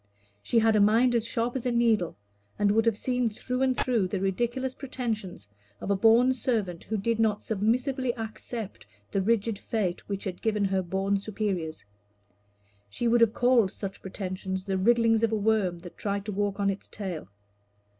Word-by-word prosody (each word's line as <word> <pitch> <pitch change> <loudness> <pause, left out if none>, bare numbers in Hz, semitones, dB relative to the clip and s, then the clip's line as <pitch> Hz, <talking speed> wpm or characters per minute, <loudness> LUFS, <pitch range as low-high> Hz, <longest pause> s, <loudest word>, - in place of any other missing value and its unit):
She 235 - 0
had 225 -1 +4
a - - +4
mind 225 +5 +4
as 230 -1 +1
sharp 235 +2 -1
as 255 -1 -2
a - - +1
needle, 225 - +2 0.4
and 205 -1 +3
would 225 +2 +2
have 225 -3 +2
seen 250 0 0
through 250 +4 -4
and 260 -1 +2
through 230 -7 +2
the 190 +1 -2
ridiculous 240 +7 -1
pretensions 225 - -4 0.3
of 200 - -3
a - - +3
born 230 +5 +5
servant 215 -9 -2
who 220 - -2
did 225 +3 0
not 215 -2 +1
submissively 245 +5 0
accept 225 - -6 0.2
the 195 - +1
rigid 220 0 +1
fate 195 -6 -2
which 200 -1 -3
had 185 -3 -5
given 210 -2 +1
her 190 -1 +1
born 195 +2 0
superiors. 195 - -3 1.0
She 235 - -2
would 235 0 +4
have 230 -1 +4
called 245 -5 +4
such 195 -1 -6
pretensions 190 0 -4
the 195 - -1
wrigglings 230 +1 +4
of 230 -1 +2
a - - +1
worm 205 -4 +1
that 175 0 -12
tried 200 -1 -2
to 210 - -3
walk 205 0 -1
on 200 0 +2
its 195 - -7
tail. 185 -7 -6
215 Hz, 185 wpm, -27 LUFS, 195-235 Hz, 1.0 s, born